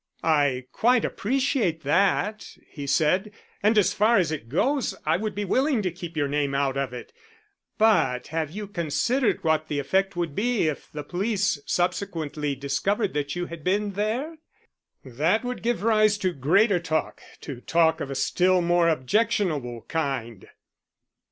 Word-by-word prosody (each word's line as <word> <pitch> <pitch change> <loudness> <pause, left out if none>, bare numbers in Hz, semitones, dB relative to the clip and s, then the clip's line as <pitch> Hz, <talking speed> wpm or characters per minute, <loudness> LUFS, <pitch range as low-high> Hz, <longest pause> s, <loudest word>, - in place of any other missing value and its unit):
"I 145 -5 +2
quite 245 0 +3
appreciate 240 - 0
that," 200 +7 0
he 145 -2 -8
said. 160 +8 +2 0.3
"And 215 +2 +3
as 205 -1 +4
far 215 +3 +3
as 175 -5 +2
it 140 -7 -5
goes 265 - 0
I 155 +1 +3
would 210 +3 -3
be 205 0 -2
willing 260 - +1
to 185 - -1
keep 175 -2 -8
your 145 -2 +1
name 140 -1 -1
out 140 -1 0
of 135 -2 -2
it. 125 - -9 0.6
But 210 - +3
have 160 -1 -2
you 205 +6 -6
considered 205 - 0
what 160 -1 +1
the 150 - -3
effect 190 +7 0
would 170 -4 -2
be 220 -1 +1
if 150 - -4
the 150 -1 -6
police 200 +1 -1
subsequently 155 -6 -1
discovered 185 - -1
that 145 0 -2
you 175 0 -2
had 170 -3 -9
been 205 +3 0
there? 230 - -2 0.7
That 155 - 0
would 250 0 -4
give 230 -4 -1
rise 215 -2 +3
to 185 -3 -1
greater 180 - +3
talk 160 -2 -2 0.2
to 130 -4 -7
talk 165 +1 +2
of 140 - -4
a 135 - -4
still 185 +6 +2
more 175 0 +3
objectionable 155 - 0
kind." 135 - -3
175 Hz, 160 wpm, -25 LUFS, 145-210 Hz, 0.7 s, as